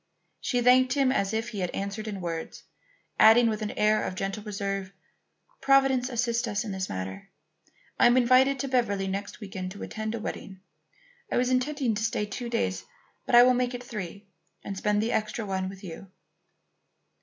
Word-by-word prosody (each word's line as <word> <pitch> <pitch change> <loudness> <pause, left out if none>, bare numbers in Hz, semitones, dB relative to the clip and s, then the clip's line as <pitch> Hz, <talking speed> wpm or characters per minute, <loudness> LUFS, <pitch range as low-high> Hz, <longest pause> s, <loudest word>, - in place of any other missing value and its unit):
She 245 -2 -1
thanked 255 +1 +5
him 275 -2 +2
as 200 -6 0
if 225 +1 -2
he 210 - -6
had 180 -2 -1
answered 200 +2 -4
in 200 -3 -5
words, 165 -2 -5 0.6
adding 230 +2 +7
with 215 0 -3
an 210 - -2
air 215 0 +3
of 185 - -4
gentle 195 +2 -3
reserve: 195 -2 -4 0.7
"Providence 270 -2 +3
assists 235 -1 0
us 205 0 -1
in 215 - -5
this 190 0 -3
matter. 95 +1 -6 0.7
I - - +7
am 240 +1 +4
invited 255 +2 +4
to 275 - -3
Beverly 230 -7 0
next 200 +1 -4
week 205 -4 -9
to 185 +2 -6
attend 220 +1 -4
a - - -4
wedding. 190 -3 -7 0.7
I - - +1
was 250 +1 +1
intending 255 -1 0
to 210 +1 -3
stay 225 -2 0
two 235 +4 -6
days, 95 - -1 0.4
but - - +3
I 240 - +10
will 255 0 +5
make 250 0 0
it 245 - -7
three 205 -5 -7 0.4
and 195 - -5
spend 210 +2 +1
the 230 - -1
extra 215 +1 -2
one 190 -1 -2
with 195 0 -11
you." 185 +1 -9
215 Hz, 190 wpm, -27 LUFS, 195-245 Hz, 0.7 s, I